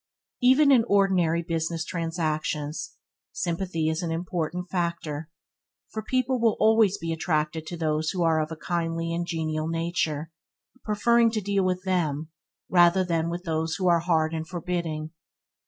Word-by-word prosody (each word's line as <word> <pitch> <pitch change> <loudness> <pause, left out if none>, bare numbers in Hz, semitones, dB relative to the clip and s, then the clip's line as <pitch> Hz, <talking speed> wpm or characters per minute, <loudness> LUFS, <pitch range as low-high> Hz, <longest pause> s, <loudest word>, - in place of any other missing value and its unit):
Even 265 +4 +6
in 245 -4 +6
ordinary 185 -5 +2
business 165 0 -2
transactions, 155 -2 -2 0.4
sympathy 170 -2 -2
is 160 +2 0
an 170 - -2
important 175 +1 -3
factor, 170 -4 -3 0.6
for 220 - -4
people 255 +1 0
will 225 -2 +3
always 220 -3 +4
be 165 0 -3
attracted 155 -1 -1
to 175 - -5
those 155 -1 0
who 180 -3 -1
are 160 -1 +3
of 155 +1 -4
a - - -4
kindly 165 0 -2
and 170 0 -2
genial 155 -2 -2
nature, 165 -2 -2 0.5
preferring 230 +2 +3
to 220 -1 -1
deal 200 -1 0
with 185 0 0
them 160 -5 -1 0.4
rather 175 +1 +5
than 165 -2 0
with 175 +1 -4
those 160 -1 -1
who 185 -2 -1
are 170 -1 +5
hard 160 -2 +1
and 160 0 -3
forbidding. 165 -3 -3
170 Hz, 155 wpm, -26 LUFS, 160-185 Hz, 0.6 s, Even